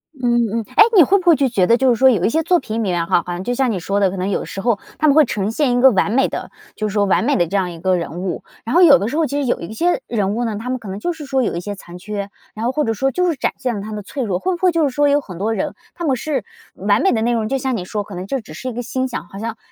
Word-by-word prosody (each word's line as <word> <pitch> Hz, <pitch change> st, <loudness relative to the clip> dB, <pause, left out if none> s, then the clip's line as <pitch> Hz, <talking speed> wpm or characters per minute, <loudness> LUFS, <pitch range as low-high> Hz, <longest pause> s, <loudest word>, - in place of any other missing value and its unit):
嗯， 240 Hz, -3 st, +1 dB
嗯。 -, -, -10 dB
诶， -, -, +9 dB
你 360 Hz, -, +9 dB
会 390 Hz, +7 st, +4 dB
不 370 Hz, -, -10 dB
会 340 Hz, -2 st, +7 dB
觉 240 Hz, -10 st, +1 dB
得 235 Hz, -, +5 dB
就 260 Hz, +1 st, +3 dB
是 240 Hz, -, +4 dB
说 265 Hz, +3 st, +5 dB
有 235 Hz, -, +1 dB
一 -, -, +3 dB
些 320 Hz, +7 st, +1 dB
作 355 Hz, +2 st, +3 dB
品 220 Hz, -5 st, -6 dB
里 -, -, -1 dB
面 180 Hz, -6 st, 0 dB
哈， 170 Hz, 0 st, +2 dB
好 180 Hz, -, -5 dB
像 175 Hz, +1 st, -5 dB
就 245 Hz, -, -1 dB
像 255 Hz, -1 st, +1 dB
你 195 Hz, -, -2 dB
说 195 Hz, +4 st, -1 dB
的， 195 Hz, -2 st, +3 dB
可 190 Hz, -, -6 dB
能 185 Hz, +2 st, -2 dB
有 200 Hz, -, -1 dB
时 195 Hz, +1 st, -6 dB
候 225 Hz, -2 st, +1 dB, 0.2 s
它 310 Hz, -, +2 dB
们 285 Hz, -, +4 dB
会 310 Hz, -1 st, +6 dB
呈 210 Hz, -3 st, -2 dB
现 255 Hz, +1 st, +1 dB
一 -, -, +2 dB
个 265 Hz, 0 st, +7 dB
完 200 Hz, -1 st, +1 dB
美 265 Hz, +4 st, +3 dB
的 -, -, -6 dB, 0.2 s
就 215 Hz, -, -2 dB
是 -, -, -7 dB
说 205 Hz, -1 st, +2 dB
完 195 Hz, -, +2 dB
美 280 Hz, +4 st, +2 dB
的 175 Hz, -, +2 dB
这 195 Hz, -, -4 dB
样 185 Hz, -2 st, -1 dB
一 165 Hz, -, -10 dB
个 185 Hz, +2 st, +1 dB
人 170 Hz, 0 st, -4 dB
物， 185 Hz, -2 st, -4 dB, 0.2 s
然 230 Hz, +5 st, -3 dB
后 355 Hz, -, +6 dB
有 295 Hz, -6 st, +8 dB
的 200 Hz, -, -2 dB
时 280 Hz, +7 st, -3 dB
候 325 Hz, -, +2 dB
其 285 Hz, 0 st, -2 dB
实 -, -, -1 dB
有 245 Hz, -, 0 dB
一 170 Hz, +5 st, -7 dB
些 345 Hz, +9 st, +1 dB
人 205 Hz, -4 st, -1 dB
物 240 Hz, +1 st, -1 dB
呢， 220 Hz, -3 st, -3 dB
他 235 Hz, +4 st, -6 dB
们 255 Hz, 0 st, -2 dB
可 220 Hz, -, -11 dB
能 190 Hz, +1 st, -5 dB
就 350 Hz, +11 st, -2 dB
是 315 Hz, -3 st, -9 dB
说 265 Hz, -1 st, 0 dB
有 220 Hz, -, -1 dB
一 -, -, -2 dB
些 205 Hz, +3 st, -5 dB
残 175 Hz, -2 st, -12 dB
缺， 200 Hz, +2 st, -5 dB, 0.2 s
然 220 Hz, +2 st, -4 dB
后 245 Hz, -, +1 dB
或 300 Hz, +3 st, 0 dB
者 225 Hz, -, 0 dB
说 270 Hz, +5 st, 0 dB
就 360 Hz, +5 st, +1 dB
是 330 Hz, -, 0 dB
展 -, -, -1 dB
现 250 Hz, -3 st, -2 dB
了 200 Hz, -, -4 dB
他 215 Hz, +2 st, -7 dB
的 210 Hz, -1 st, -5 dB
脆 260 Hz, +7 st, -5 dB
弱， 190 Hz, -6 st, -1 dB
会 370 Hz, -, -1 dB
不 -, -, -7 dB
会 370 Hz, -1 st, +4 dB
就 335 Hz, -1 st, +1 dB
是 -, -, -1 dB
说 290 Hz, +3 st, +2 dB
有 285 Hz, +1 st, +3 dB
很 185 Hz, -9 st, -10 dB
多 215 Hz, +5 st, -1 dB
人 200 Hz, -, -2 dB, 0.2 s
他 345 Hz, -, -7 dB
们 275 Hz, -4 st, +2 dB
是 280 Hz, +3 st, -2 dB, 0.3 s
完 -, -, +1 dB
美 385 Hz, -, +3 dB
的 225 Hz, -, 0 dB
内 235 Hz, +2 st, +1 dB
容， 225 Hz, -2 st, 0 dB
就 270 Hz, +4 st, 0 dB
像 260 Hz, -1 st, -1 dB
你 180 Hz, -, -5 dB
说 205 Hz, +2 st, -3 dB
可 200 Hz, -1 st, -10 dB
能 180 Hz, +1 st, -5 dB
就 270 Hz, +7 st, -2 dB
只 195 Hz, -9 st, -12 dB
是 210 Hz, +10 st, -5 dB
一 -, -, -6 dB
个 245 Hz, -, -4 dB
欣 260 Hz, +2 st, -2 dB
赏， 240 Hz, -9 st, -6 dB
好 195 Hz, -, -10 dB
像 225 Hz, +1 st, -4 dB
230 Hz, 385 characters per minute, -19 LUFS, 200-270 Hz, 0.3 s, 诶